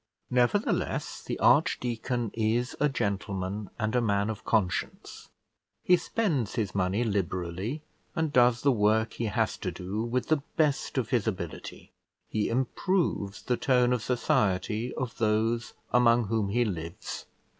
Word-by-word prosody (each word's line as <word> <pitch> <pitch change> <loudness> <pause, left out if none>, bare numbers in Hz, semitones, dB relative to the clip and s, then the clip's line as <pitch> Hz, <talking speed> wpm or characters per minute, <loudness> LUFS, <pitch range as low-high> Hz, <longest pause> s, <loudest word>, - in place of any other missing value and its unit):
Nevertheless, 125 - +1
the - - -4
archdeacon 120 -1 +2
is 115 +3 0
a 150 - +3
gentleman 100 -3 -2
and 110 +1 -1
a 125 - +3
man 100 -1 +1
of 110 +1 -8
conscience; 105 -6 -1 0.5
he 180 - +6
spends 165 - -1
his 110 -6 -1
money 95 +4 +1
liberally, 95 - -2 0.3
and 160 -2 -1
does 120 -2 +4
the 140 - +5
work 110 0 +2
he 115 - -3
has 110 +1 0
to 95 - -3
do 95 +5 -4
with 125 +2 -2
the 155 -2 +3 0.2
best 150 -3 +1
of 120 -4 -1
his 115 -3 +1
ability; 90 -6 -5 0.4
he 105 -1 -1
improves 130 - 0
the 125 - 0
tone 125 -2 +3
of 125 - 0
society 110 -1 0
of 125 -2 -4
those 110 +1 +1 0.2
among 120 -1 +5
whom 110 -3 0
he 120 +4 +2
lives. 85 -5 -5
115 Hz, 145 wpm, -28 LUFS, 100-125 Hz, 0.5 s, he